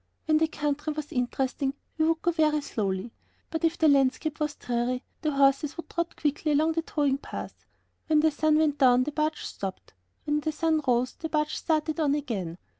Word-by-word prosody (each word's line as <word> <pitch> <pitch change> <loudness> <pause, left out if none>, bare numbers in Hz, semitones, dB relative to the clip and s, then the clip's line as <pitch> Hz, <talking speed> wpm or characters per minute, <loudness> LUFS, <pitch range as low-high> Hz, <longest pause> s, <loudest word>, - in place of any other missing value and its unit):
When 310 -1 +3
the 320 - +3
country 295 0 -2
was 300 -1 -6
interesting 265 +2 -1 0.2
we 315 - +4
would 325 0 0
go 345 - +3
very 305 -2 +2
slowly, 200 -4 -2 0.4
but 320 0 -3
if 330 +1 +2
the 320 - +4
landscape 285 +2 +2
was 300 -1 -1
dreary, 245 +1 -2 0.2
the 310 - 0
horses 275 +2 +3
would 335 - -8
trot 340 0 -2
quickly 300 0 0
along 310 +3 +3
the 330 0 0
towing 285 -4 0
path. - - -8 0.4
When 310 -2 +4
the 315 0 +4
sun 305 +1 +2
went 305 -2 +2
down 255 -2 +5
the 300 - -3
barge 305 +1 -1
stopped; 190 - -6 0.3
when 295 0 +1
the 310 +1 -2
sun 315 0 +1
rose 250 0 +2
the 320 - -6
barge 300 0 0
started 315 0 0
on 290 -2 +2
again. 200 - -3
300 Hz, 195 wpm, -27 LUFS, 270-315 Hz, 0.4 s, down